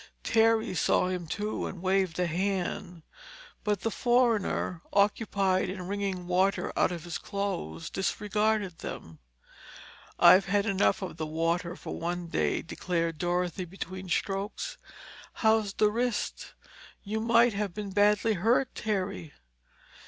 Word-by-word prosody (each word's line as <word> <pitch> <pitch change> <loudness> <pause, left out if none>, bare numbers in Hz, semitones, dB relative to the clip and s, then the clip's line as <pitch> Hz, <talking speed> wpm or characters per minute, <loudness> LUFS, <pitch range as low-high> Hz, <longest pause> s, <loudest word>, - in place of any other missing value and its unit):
Terry 225 -3 +3
saw 180 0 +2
him 180 -2 -3
too, 210 +6 -3
and 185 - -7
waved 185 -2 +1
a 180 - +1
hand. 180 -1 -2 0.6
But 210 -4 0
the 225 - -1
foreigner, 230 -8 +1
occupied 200 -2 +2
in 185 -1 -5
wringing 195 -2 -2
water 185 +2 +1
out - - +2
of 170 -3 -5
his 175 -2 -5
clothes, 195 - -4
disregarded 210 -1 0
them. 80 -1 -8 1.0
"I've 190 +1 +7
had 200 +1 +2
enough 200 -1 +2
of 180 - -6
the 155 -2 -3
water 165 +2 -1
for - - -7
one 175 0 -3
day," - - 0
declared 165 -2 -2
Dorothy 180 +1 -1
between 185 +1 -7
strokes. 200 - -2 0.5
"How's 220 -2 +2
the 210 0 +3
wrist? 240 0 -2 0.5
You 215 +2 -2
might 235 +1 +4
have 200 -1 -2
been 205 -2 -5
badly 210 +2 +3
hurt, 230 +7 +2
Terry." 195 -6 -3
195 Hz, 130 wpm, -29 LUFS, 175-210 Hz, 1.0 s, I've